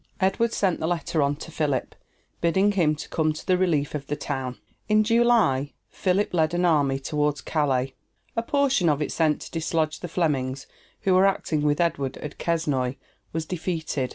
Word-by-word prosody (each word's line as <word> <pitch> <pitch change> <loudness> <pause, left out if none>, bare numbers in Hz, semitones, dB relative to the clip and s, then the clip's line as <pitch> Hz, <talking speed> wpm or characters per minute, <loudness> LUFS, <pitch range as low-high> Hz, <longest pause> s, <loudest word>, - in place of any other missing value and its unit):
Edward 195 +5 +2
sent 190 -6 +1
the 160 - -1
letter 170 -1 0
on 140 0 +2
to 160 +2 -9
Philip, 145 -5 -1 0.5
bidding 190 +5 +3
him 165 -6 +2
come 155 +1 -1
to 150 - -9
the 185 - +3
relief 165 -6 +1
of 145 -2 -5
the 145 - -1
town. 135 -4 -4 0.3
In 215 0 +5
July 225 - +3 0.2
Philip 190 +2 0
led 160 -1 +2
an 175 +1 +2
army 145 -5 +3
toward 145 +1 -1
Calais. 135 -4 0 0.4
A 230 - +1
portion 270 - +2
of 145 -1 +2
it - - -4
sent 155 -2 +1
to - - -9
dislodge 160 -1 -1
the 175 - -5
Flemings, 140 -6 -1 0.4
who 190 -3 +2
were 185 +2 +6
acting 160 -5 0
with 145 0 +1
Edward 140 -6 0
at 150 - -8
Quesnoy 145 -7 0 0.4
was 160 0 -3
defeated. 160 -6 -2
160 Hz, 180 wpm, -25 LUFS, 145-180 Hz, 0.5 s, were